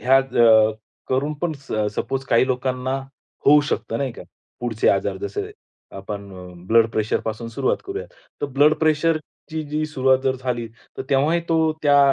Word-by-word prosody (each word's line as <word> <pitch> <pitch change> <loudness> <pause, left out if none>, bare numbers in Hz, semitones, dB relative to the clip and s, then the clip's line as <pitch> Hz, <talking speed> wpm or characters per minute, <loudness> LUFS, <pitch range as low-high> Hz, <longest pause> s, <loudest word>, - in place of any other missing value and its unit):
ह्या 135 +2 +5
ज - - -5 0.7
करून 140 +4 0
पण 175 -2 0
स - - -7 0.2
सपोज 135 0 -2
काही 115 +2 +4
लोकांना 130 0 -1 0.5
होऊ 150 +1 +8
शकतं 115 - -2
नाही 135 -3 -2
का. - - -10 0.4
पुढचे 115 -3 0
आजार 100 0 +1
जसे 100 +1 -4 0.5
आपण 100 +1 -6 0.4
ब्लड 115 +2 +5
प्रेशरपासून 110 +1 -2
सुरुवात 130 +4 0
करूया. 395 +4 -5 0.4
तर - - +1
ब्लड 145 +3 +4
प्रेशरची 155 0 -1
जी 155 +1 0
सुरुवात 130 -3 +2
जर 130 0 +1
झाली 125 -2 -3 0.3
तर - - -2
तेव्हाही 150 +5 +3
तो 160 -1 +2
त्या 145 -1 +5
135 Hz, 155 wpm, -22 LUFS, 115-150 Hz, 0.7 s, होऊ